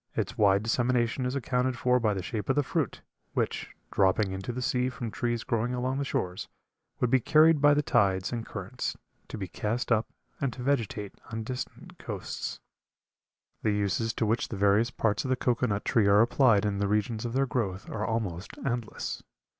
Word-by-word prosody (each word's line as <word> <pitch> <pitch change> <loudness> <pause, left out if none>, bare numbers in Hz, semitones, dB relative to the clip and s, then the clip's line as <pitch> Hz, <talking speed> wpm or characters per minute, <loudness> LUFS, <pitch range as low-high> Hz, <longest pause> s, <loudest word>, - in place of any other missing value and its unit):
Its - - -2
wide 100 -1 +4
dissemination 120 +2 +1
is 125 - -2
accounted 125 -1 0
for 125 0 +3
by 110 -3 +2
the 95 - -3
shape 105 +5 -4
of 135 - +3
the 145 - +3
fruit, - - -2 0.3
which, - - -2 0.2
dropping 95 +1 +3
into 95 +4 -4
the 125 - -4
sea 125 0 +1
from 120 -3 -5
trees 120 0 -1
growing 120 +2 0
along 130 +2 -1
the - - 0
shores, 90 -9 -2 0.5
would 125 - +1
be 130 - +5
carried 155 +4 +5
by 145 0 +6
the 150 - +2
tides 95 -6 +2
and 115 -1 -2
currents 110 +4 -5 0.3
to - - -6
be 95 -3 -4
cast 115 +7 -2
up 115 -1 +3 0.3
and 135 -3 -1
to 125 - -7
vegetate 115 -7 -1 0.2
on 110 0 -3
distant 125 +3 -7
coasts. - - -5 1.0
The - - +1
uses 105 +3 0
to 115 - 0
which 110 +2 +1
the 105 - -5
various 100 +4 +4
parts 110 -3 0
of 130 - -3
the 130 - +3
cocoa 125 0 +1
nut 100 -2 -2
tree 110 -4 +3
are 100 +1 +6
applied 115 -3 +4
in 100 -1 0
the 100 - +1
regions 105 +2 0
of 120 -1 -3
their 135 +1 +2
growth 105 -7 -2
are 105 - -3
almost 105 -6 -2
endless. 120 -4 -3
115 Hz, 195 wpm, -29 LUFS, 105-125 Hz, 1.0 s, by